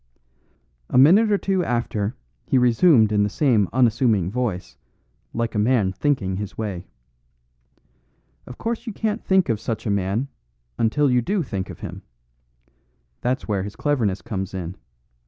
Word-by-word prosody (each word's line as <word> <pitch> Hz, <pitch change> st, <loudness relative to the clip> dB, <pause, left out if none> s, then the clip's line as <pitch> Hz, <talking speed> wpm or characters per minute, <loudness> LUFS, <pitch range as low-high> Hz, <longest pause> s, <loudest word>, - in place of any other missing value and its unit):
A -, -, +1 dB
minute 195 Hz, -, +6 dB
or 205 Hz, -, +4 dB
two 190 Hz, -2 st, 0 dB
after 115 Hz, -3 st, -2 dB, 0.3 s
he 135 Hz, -, +2 dB
resumed 125 Hz, -, +4 dB
in 105 Hz, -1 st, +2 dB
the 105 Hz, -, +2 dB
same 110 Hz, -, +2 dB
unassuming 115 Hz, -6 st, +2 dB
voice, 115 Hz, -6 st, -3 dB, 0.6 s
like 115 Hz, 0 st, -2 dB
a 105 Hz, -, -1 dB
man 105 Hz, -4 st, +2 dB
thinking 100 Hz, -9 st, -1 dB
his 105 Hz, 0 st, -6 dB
way. 100 Hz, -5 st, -4 dB, 1.6 s
"Of 125 Hz, -, -10 dB
course 230 Hz, +1 st, -4 dB
you 225 Hz, -, -4 dB
can't 220 Hz, +2 st, -2 dB
think 190 Hz, -2 st, +3 dB
of 115 Hz, -4 st, 0 dB
such 110 Hz, 0 st, -4 dB
a 105 Hz, -, 0 dB
man, 100 Hz, +6 st, -1 dB, 0.5 s
until 135 Hz, +5 st, +2 dB
you 125 Hz, 0 st, +3 dB
do 195 Hz, -, -1 dB
think 95 Hz, -8 st, -4 dB
of -, -, -10 dB
him. -, -, -7 dB, 1.2 s
That's 125 Hz, +2 st, -1 dB
where 100 Hz, -3 st, 0 dB
his 100 Hz, +1 st, -6 dB
cleverness 120 Hz, -11 st, 0 dB
comes 95 Hz, -5 st, -4 dB
in. 90 Hz, -1 st, -5 dB
115 Hz, 155 wpm, -23 LUFS, 100-140 Hz, 1.6 s, minute